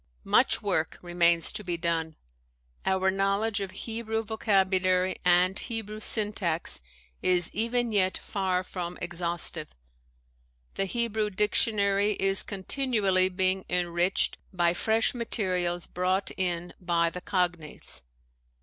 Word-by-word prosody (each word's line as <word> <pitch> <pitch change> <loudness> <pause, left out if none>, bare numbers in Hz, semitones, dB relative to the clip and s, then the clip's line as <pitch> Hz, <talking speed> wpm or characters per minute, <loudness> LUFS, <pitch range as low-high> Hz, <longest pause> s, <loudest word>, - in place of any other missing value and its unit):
Much - - +3
work - - 0
remains 170 -1 +3
to 210 - -4
be 175 -3 -2
done. 165 -2 -2 0.7
Our 190 0 +2
knowledge 200 +3 0
of 195 -1 -4
Hebrew 225 +2 -4
vocabulary 190 -4 +1
and 180 +2 +3
Hebrew 220 -2 -4
syntax, 205 - +1 0.4
is 180 -2 +3
even 235 +2 0
yet 190 -3 +2
far 185 -2 -2
from 180 -1 -6
exhaustive. 170 - -1 1.0
The 195 - -1
Hebrew 220 0 -1
dictionary 205 0 +2
is 195 0 +2
continually 200 -3 +1
being 185 0 0
enriched 175 +1 +1
by 175 -3 +2
fresh 220 +5 +1
materials 185 -7 -1
brought 185 +2 -1
in 175 -1 -2
by 170 -2 +1
the 180 - -7
cognates. 175 -5 -2
190 Hz, 115 wpm, -27 LUFS, 175-210 Hz, 1.0 s, Much